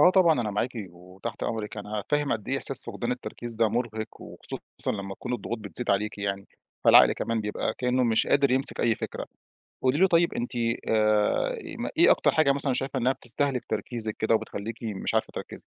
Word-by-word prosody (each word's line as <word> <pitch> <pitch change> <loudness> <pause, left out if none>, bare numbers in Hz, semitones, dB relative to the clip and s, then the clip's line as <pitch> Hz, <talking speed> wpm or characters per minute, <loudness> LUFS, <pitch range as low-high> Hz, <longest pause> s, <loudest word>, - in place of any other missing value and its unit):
آه 180 - +8
طبعًا 170 -7 +4
أنا 110 -3 -1
معاكِ 105 +5 -1 0.2
وتحت 90 +5 -8
أمرِك، 110 -2 -3
أنا 105 0 -4
فاهم 145 -1 +1
قد 110 0 -4
إيه 135 - +1
إحساس 135 - 0
فقدان 120 +1 -3
التركيز 120 -1 -6
ده 110 0 +3
مُرِهق، 110 -1 -3
وخصوصًا - - -6
لمّا 100 -2 -5
تكون 125 - -6
الضغوط 120 0 -3
بتزيد 105 +3 -4
عليكِ 105 +1 0
يعني، 100 -1 -2 0.4
فالعقل - - +8
كمان 115 -1 -2
بيبقى 105 0 -2
كإنه 125 0 +1
مش 115 -2 +2
قادر 140 -1 +3
يمسك 130 +2 +2
أي 115 - +3
فكرة، - - -5 0.6
قولي 130 +2 +2
له 190 +4 +5
طيب 170 -2 +3
أنتِ 120 +1 -3 0.4
آآ 110 -1 +2
إيه - - -8
ما - - -3
إيه - - +7
أكتر - - +3
حاجة 155 -3 +4
مثلًا 140 -1 0
شايفة 135 +1 -2
إنّها 125 +2 +3
بتستهلِك 130 +1 -2
تركيزِك 110 0 -3
كده 110 +1 +2
وبتخلّيكِ 110 0 -4
مش 105 -4 -3
عارفة - - +1
تركّزي؟ - - -7
115 Hz, 195 wpm, -27 LUFS, 105-130 Hz, 0.6 s, آه